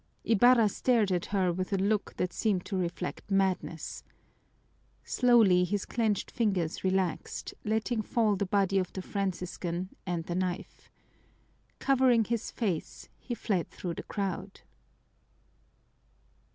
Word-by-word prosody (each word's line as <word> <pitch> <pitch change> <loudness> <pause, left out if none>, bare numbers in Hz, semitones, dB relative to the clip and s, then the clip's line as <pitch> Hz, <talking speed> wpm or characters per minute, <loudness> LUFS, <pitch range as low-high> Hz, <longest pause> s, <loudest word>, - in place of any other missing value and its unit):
Ibarra 230 +1 +5
stared 220 -1 +2
at 180 -2 0
her 185 -3 +1
with 185 +3 -3
a 195 - +2
look 205 +2 0
that 180 -1 -1
seemed 200 -5 0
to 200 - -4
reflect 175 -2 -3
madness. 190 -4 -1 1.0
Slowly 225 -8 +5
his 195 +2 -1
clenched 220 -4 -1
fingers 190 -8 0
relaxed, 185 -2 -1
letting 220 +2 0
fall 215 -1 +1
the 195 0 -2
body 195 0 +2
of 185 - -2
the 190 - -5
Franciscan 180 -2 -3 0.2
and 175 -2 -1
the 170 - -4
knife. 180 0 -4 0.9
Covering 255 -4 +4
his 230 +1 -2
face, 195 -9 -3
he 240 - -5
fled 190 -7 -1
through 175 -2 -5
the - - -5
crowd. 195 -4 -4
195 Hz, 125 wpm, -30 LUFS, 180-220 Hz, 1.0 s, Ibarra